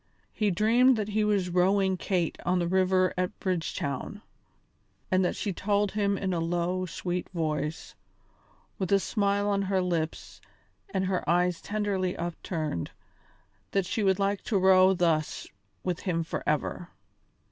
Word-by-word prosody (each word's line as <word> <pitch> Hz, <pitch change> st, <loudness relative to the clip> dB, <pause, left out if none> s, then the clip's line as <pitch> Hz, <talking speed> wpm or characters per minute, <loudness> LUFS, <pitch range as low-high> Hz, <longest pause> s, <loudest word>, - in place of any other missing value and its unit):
He 210 Hz, -1 st, +1 dB
dreamed 230 Hz, +7 st, +4 dB
that 215 Hz, -1 st, -2 dB
he 215 Hz, +1 st, +1 dB
was 200 Hz, -4 st, +1 dB
rowing 190 Hz, +2 st, +3 dB
Kate 180 Hz, -2 st, -1 dB
on 180 Hz, +1 st, +1 dB
the 175 Hz, -1 st, 0 dB
river 185 Hz, 0 st, +2 dB
at 180 Hz, 0 st, -2 dB
Bridgetown, 180 Hz, -, -3 dB, 0.9 s
and 185 Hz, 0 st, +3 dB
that 180 Hz, -, 0 dB
she 200 Hz, -, -2 dB
told 205 Hz, +2 st, 0 dB
him 200 Hz, -1 st, 0 dB
in 190 Hz, -1 st, -1 dB
a 170 Hz, -, 0 dB
low 175 Hz, +2 st, -1 dB
sweet 180 Hz, +1 st, -4 dB
voice, 155 Hz, -3 st, -3 dB, 0.9 s
with 190 Hz, -2 st, -2 dB
a 200 Hz, -, +5 dB
smile 200 Hz, 0 st, 0 dB
on 200 Hz, -1 st, +1 dB
her 195 Hz, -1 st, 0 dB
lips 170 Hz, -3 st, -3 dB, 0.5 s
and 190 Hz, -1 st, 0 dB
her 185 Hz, -1 st, -1 dB
eyes 175 Hz, 0 st, +2 dB
tenderly 200 Hz, -3 st, -1 dB
upturned, 165 Hz, -, -3 dB, 0.8 s
that 195 Hz, -2 st, +2 dB
she 200 Hz, +4 st, -2 dB
would 190 Hz, -2 st, +3 dB
like 200 Hz, 0 st, 0 dB
to 215 Hz, -, +1 dB
row 190 Hz, 0 st, +5 dB
thus 165 Hz, -4 st, 0 dB, 0.4 s
with 180 Hz, -2 st, -2 dB
him 165 Hz, -3 st, -1 dB
forever. 160 Hz, +2 st, -2 dB
185 Hz, 145 wpm, -28 LUFS, 175-200 Hz, 0.9 s, a